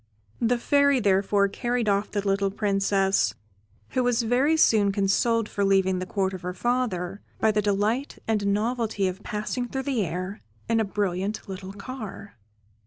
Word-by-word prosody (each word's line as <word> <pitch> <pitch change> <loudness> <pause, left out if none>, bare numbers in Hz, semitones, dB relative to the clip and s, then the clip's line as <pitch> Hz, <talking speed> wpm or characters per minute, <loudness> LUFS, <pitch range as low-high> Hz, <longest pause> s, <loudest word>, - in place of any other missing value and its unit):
The 240 +1 +2
Fairy 280 +2 +3
therefore 200 -1 +3
carried 240 +3 -2
off 200 +1 +1
the 205 -1 -2
little 195 0 +2
Princess, 195 - +1 0.5
who 255 - 0
was 245 -1 +2
very 260 +7 +2
soon 210 -9 +4
consoled 210 +3 +1
for 200 - -2
leaving 190 -1 +3
the 185 - -4
Court 190 -1 -1
of 185 - -6
her 180 0 -5
father, 210 -6 -1 0.2
by 220 - +3
the 210 0 +1
delight 210 +7 0
and 210 -2 +1
novelty 220 -1 0
of 185 +2 -5
passing 215 +5 -3
through 265 +2 -3
the 260 -6 0
air 185 +4 -4 0.3
in 230 0 +2
a 220 - +2
brilliant 200 +1 -2
little 190 0 -7
car. 205 -2 -8
205 Hz, 165 wpm, -26 LUFS, 195-235 Hz, 0.5 s, soon